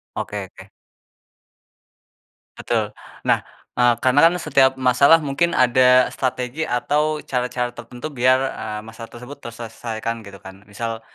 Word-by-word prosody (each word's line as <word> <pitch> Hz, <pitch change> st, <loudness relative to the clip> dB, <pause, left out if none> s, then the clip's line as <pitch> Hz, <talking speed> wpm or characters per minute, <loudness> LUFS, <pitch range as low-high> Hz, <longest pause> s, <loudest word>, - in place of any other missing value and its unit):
Oke -, -, -4 dB
oke. -, -, -15 dB, 1.9 s
Betul. -, -, 0 dB, 0.4 s
Nah, -, -, +4 dB, 0.4 s
eee, 125 Hz, -1 st, +5 dB
karena 130 Hz, +2 st, +4 dB
kan 170 Hz, -, +5 dB
setiap 135 Hz, -2 st, +4 dB
masalah 130 Hz, +5 st, +5 dB
mungkin 170 Hz, +5 st, 0 dB
ada 125 Hz, 0 st, +5 dB
strategi 125 Hz, +3 st, -3 dB
atau 150 Hz, +5 st, 0 dB
cara-cara 125 Hz, -1 st, -2 dB
tertentu 120 Hz, +4 st, -8 dB
biar, 130 Hz, 0 st, +3 dB, 0.2 s
eee, 110 Hz, -1 st, -4 dB
masalah 115 Hz, +1 st, -10 dB
tersebut 125 Hz, +4 st, -10 dB
terselesaikan, 115 Hz, 0 st, -6 dB
gitu, 100 Hz, 0 st, -11 dB
kan? 95 Hz, 0 st, -12 dB
Misal, 115 Hz, +2 st, -5 dB
125 Hz, 125 wpm, -21 LUFS, 115-130 Hz, 1.9 s, eee